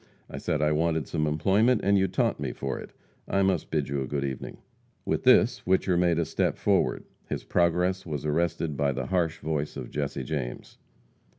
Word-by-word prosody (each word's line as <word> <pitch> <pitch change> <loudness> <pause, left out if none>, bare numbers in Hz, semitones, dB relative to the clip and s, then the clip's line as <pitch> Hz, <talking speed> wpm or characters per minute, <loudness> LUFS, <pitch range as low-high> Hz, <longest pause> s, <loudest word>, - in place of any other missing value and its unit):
I - - -5
said 75 -1 -1
I 75 - +3
wanted 80 0 0
some 75 -2 -1
employment, 100 +10 +3
and 100 0 +3
you 95 -1 +3
taunt 95 - 0
me - - -3
for 70 -1 -4
it. - - -9 0.4
I 100 0 +2
must 95 -4 0
bid 75 -3 0
you 70 0 -2
good 70 -1 -2
evening." 65 -2 -5 0.5
With - - -1
this, - - +5
Whicher 95 0 +2
made 85 -2 +2
a 85 - +1
step - - 0
forward. - - +1 0.3
His - - -3
progress 90 +2 +1
was 75 -3 -5
arrested 80 0 0
by 70 0 +1
the 65 -1 -3
harsh 85 0 0
voice 75 -1 -3
of - - -7
Jesse 70 -2 -3
James. 65 -2 -5
80 Hz, 190 wpm, -27 LUFS, 75-90 Hz, 0.5 s, this